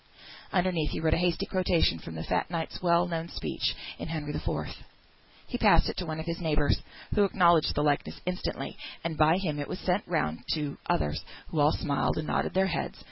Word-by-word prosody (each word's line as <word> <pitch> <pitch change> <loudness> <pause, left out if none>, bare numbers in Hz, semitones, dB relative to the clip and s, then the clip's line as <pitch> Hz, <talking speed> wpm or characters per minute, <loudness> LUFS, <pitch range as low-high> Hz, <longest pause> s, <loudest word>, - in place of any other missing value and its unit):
Underneath 180 -4 +1
he - - -3
wrote 160 -1 +2
a - - +4
hasty 175 +2 +1
quotation 180 - +2
from 80 - -8
the 80 - -4
fat 90 - 0
knight's 165 -2 -3
well 175 0 +4
known 165 -1 -3
speech - - -2 0.2
in - - -4
Henry 155 -2 -3
IV. - - -2 1.0
He - - -3
passed - - +5
it - - -5
to 180 - -2
one 155 0 -3
of 160 - -4
his 170 -1 -3
neighbours, 150 -4 +2 0.3
who 205 - +4
acknowledged 175 -4 +4
the 145 - +2
likeness 145 -1 0
instantly, 180 0 -3 0.3
and 165 -1 -2
by 155 +3 +5
him 160 -6 -2
it 145 - -3
was - - -4
sent 185 +2 +1
round 85 - 0 0.2
to 150 -2 -3
others, 75 -1 0 0.3
who 155 - -1
all 145 +1 +5
smiled 145 -3 0
and 155 - -2
nodded - - -1
their 190 0 +4
heads. 170 - -2
160 Hz, 205 wpm, -29 LUFS, 150-180 Hz, 1.0 s, passed